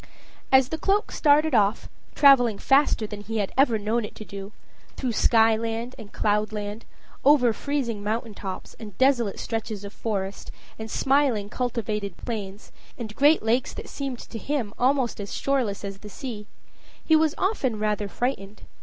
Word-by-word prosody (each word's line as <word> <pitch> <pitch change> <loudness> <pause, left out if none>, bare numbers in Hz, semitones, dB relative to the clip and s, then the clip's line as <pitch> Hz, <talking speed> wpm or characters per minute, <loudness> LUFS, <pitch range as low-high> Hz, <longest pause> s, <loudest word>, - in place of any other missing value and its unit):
As 265 -1 +5
the 320 - -3
cloak 405 +3 +1
started 300 0 +3
off, 210 -1 +2 0.3
traveling 245 -7 +6
faster 270 -4 +3
than 210 -1 -7
he 225 +2 -4
had 200 -2 -2
ever 265 -4 +4
known 220 +3 -1
it 210 - -8
to 215 - -9
do, 200 0 -8 0.4
through 255 -3 -2
sky 225 0 +4
land 230 +2 -3
and 210 -2 -10
cloud 210 0 0
land, 210 +1 -5 0.4
over 260 -5 +5
freezing 250 -6 -2
mountain 220 +1 -2
tops, 190 -2 -7
and 210 -5 -10
desolate 260 -6 +2
stretches 220 -3 -4
of 200 0 -8
forest, 200 -3 -4 0.3
and 220 0 -6
smiling 265 -6 +1
cultivated 210 -6 -3
plains, 205 -3 -6 0.3
and 220 -3 -7
great 295 0 +4
lakes 235 +3 0
that - - -8
seemed 275 -3 -4
to 230 - -8
him 250 -5 -2
almost 255 -3 +1
as 200 - -6
shoreless 245 -8 -1
as 195 0 -6
the 210 - -10
sea, 210 -2 -7 0.6
he 320 - +5
was 315 0 +3
often 285 - 0
rather 210 -1 -1
frightened. 210 -3 -4
225 Hz, 165 wpm, -25 LUFS, 210-265 Hz, 0.6 s, traveling